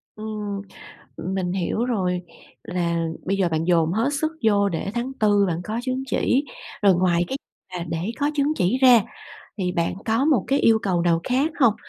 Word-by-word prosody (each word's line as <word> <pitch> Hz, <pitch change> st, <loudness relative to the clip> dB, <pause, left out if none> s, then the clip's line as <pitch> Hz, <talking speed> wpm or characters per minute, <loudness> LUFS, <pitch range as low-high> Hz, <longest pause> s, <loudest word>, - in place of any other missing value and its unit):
Ừm, 210 Hz, -2 st, -5 dB, 0.6 s
mình 185 Hz, -1 st, -2 dB
hiểu 195 Hz, +5 st, -1 dB
rồi, 180 Hz, -7 st, -1 dB, 0.4 s
là 170 Hz, -2 st, -1 dB, 0.2 s
bây 195 Hz, +1 st, +1 dB
giờ 185 Hz, -3 st, +2 dB
bạn 160 Hz, 0 st, -1 dB
dồn 165 Hz, -2 st, +2 dB
hết 225 Hz, +7 st, +1 dB
sức 315 Hz, +2 st, -1 dB
vô 200 Hz, -2 st, +3 dB
để 180 Hz, +2 st, -3 dB
tháng 245 Hz, +3 st, -2 dB
Tư 205 Hz, -1 st, +4 dB
bạn 170 Hz, 0 st, -2 dB
có 220 Hz, +2 st, -3 dB
chứng 260 Hz, +1 st, -2 dB
chỉ, 270 Hz, +2 st, +1 dB, 0.4 s
rồi 195 Hz, -3 st, +6 dB
ngoài 175 Hz, -1 st, +2 dB
cái 270 Hz, -, -2 dB, 0.4 s
mà 170 Hz, -, -4 dB
để 165 Hz, +7 st, -2 dB
có 290 Hz, +1 st, +2 dB
chứng 290 Hz, +1 st, +1 dB
chỉ 190 Hz, +8 st, +1 dB
ra 245 Hz, -3 st, +8 dB, 0.6 s
thì 180 Hz, -1 st, -1 dB
bạn 170 Hz, -1 st, -1 dB
có 225 Hz, +4 st, +1 dB
một 280 Hz, -11 st, +3 dB
cái 275 Hz, +3 st, +2 dB
yêu 225 Hz, -1 st, +5 dB
cầu 185 Hz, -5 st, 0 dB
nào 170 Hz, -1 st, +2 dB
khác 270 Hz, +5 st, +1 dB
hông? 230 Hz, -5 st, +5 dB
200 Hz, 190 wpm, -23 LUFS, 175-245 Hz, 0.6 s, ra